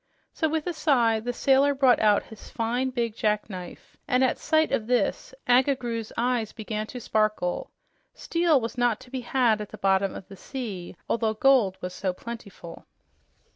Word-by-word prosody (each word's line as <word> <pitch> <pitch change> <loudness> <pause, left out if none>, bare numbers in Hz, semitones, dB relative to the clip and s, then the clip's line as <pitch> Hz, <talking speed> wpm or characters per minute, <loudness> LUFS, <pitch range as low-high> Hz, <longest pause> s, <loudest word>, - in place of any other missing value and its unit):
So 320 - 0
with 315 0 -1
a 355 - -2
sigh 240 -8 +2
the 245 +3 -3
sailor 275 +3 +3
brought 265 -2 +4
out 210 -1 +4
his 220 - -13
fine, 245 +3 -1
big 235 -3 -2
jackknife, 210 -5 -3
and 250 +1 +3
at 260 - +1
sight 315 -1 +2
of 215 - -1
this 250 - 0
Agga 260 +3 +4
Groo's 230 -3 -4
eyes 235 -2 0
began 215 -1 -4
to 250 - -7
sparkle. 215 -6 -1 0.5
Steel 335 -4 +2
was 230 +1 -5
not 240 -3 +2
to 255 -1 -15
be 260 -1 -3
had 245 -6 +2
at 210 - -7
the - - -10
bottom 195 0 +1
of 185 - -9
the 195 - -11
sea, 200 -6 -6
although 225 -2 0
gold 230 -6 +3
was 180 0 -5
so 185 0 -2
plentiful. 200 -5 -10
235 Hz, 175 wpm, -26 LUFS, 210-260 Hz, 0.5 s, brought